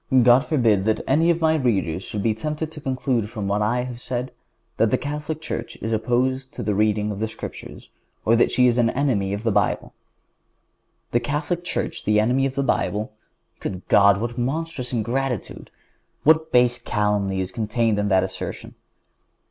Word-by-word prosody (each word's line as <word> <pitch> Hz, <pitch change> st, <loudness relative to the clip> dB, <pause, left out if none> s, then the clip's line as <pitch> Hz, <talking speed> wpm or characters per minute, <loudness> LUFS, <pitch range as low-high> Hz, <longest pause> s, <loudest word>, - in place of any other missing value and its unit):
God 120 Hz, +1 st, +7 dB
forbid 115 Hz, -10 st, +2 dB
that 110 Hz, 0 st, +1 dB
any 160 Hz, +5 st, +3 dB
of 170 Hz, 0 st, +2 dB
my 160 Hz, 0 st, +4 dB
readers 100 Hz, -, 0 dB
should 100 Hz, 0 st, -5 dB
be 115 Hz, -, +2 dB
tempted 150 Hz, +7 st, -4 dB
to 155 Hz, -1 st, -10 dB
conclude 130 Hz, -5 st, -1 dB
from 110 Hz, -4 st, -4 dB
what 100 Hz, +1 st, 0 dB
I 120 Hz, +4 st, +1 dB
have 125 Hz, -1 st, -7 dB
said 125 Hz, 0 st, -3 dB, 0.5 s
that 115 Hz, -, +3 dB
the -, -, +2 dB
Catholic 150 Hz, +2 st, -4 dB
Church 120 Hz, -7 st, -5 dB
is 110 Hz, -, -3 dB
opposed 130 Hz, +4 st, 0 dB
to 120 Hz, -, -4 dB
the 105 Hz, 0 st, 0 dB
reading 105 Hz, 0 st, +1 dB
of 100 Hz, -, -5 dB
the 110 Hz, -, 0 dB
Scriptures, 110 Hz, -, -9 dB, 0.3 s
or 115 Hz, -, +5 dB
that 120 Hz, -, +4 dB
she 125 Hz, +1 st, +3 dB
is 120 Hz, -1 st, +3 dB
the 120 Hz, 0 st, +2 dB
enemy 115 Hz, -9 st, +1 dB
of 100 Hz, +2 st, -3 dB
the 115 Hz, -, +1 dB
Bible. 100 Hz, -1 st, 0 dB, 1.2 s
The 120 Hz, -, +3 dB
Catholic 150 Hz, +6 st, -2 dB
Church 175 Hz, -, -3 dB
the 105 Hz, 0 st, +3 dB
enemy 125 Hz, +5 st, +2 dB
of 135 Hz, -, -7 dB
the 140 Hz, -, 0 dB
Bible! 105 Hz, -5 st, -1 dB, 0.5 s
Good 90 Hz, -1 st, -6 dB
God! 100 Hz, -1 st, +6 dB
What 120 Hz, +2 st, -3 dB
monstrous 135 Hz, 0 st, -3 dB
ingratitude! 125 Hz, 0 st, -2 dB, 0.5 s
What 160 Hz, +1 st, +4 dB
base 125 Hz, 0 st, +4 dB
calumny 105 Hz, -4 st, 0 dB
is 95 Hz, -1 st, -3 dB
contained 110 Hz, -1 st, 0 dB
in 105 Hz, -, 0 dB
that 95 Hz, -2 st, +3 dB
assertion! 95 Hz, 0 st, -6 dB
120 Hz, 180 wpm, -23 LUFS, 105-135 Hz, 1.2 s, God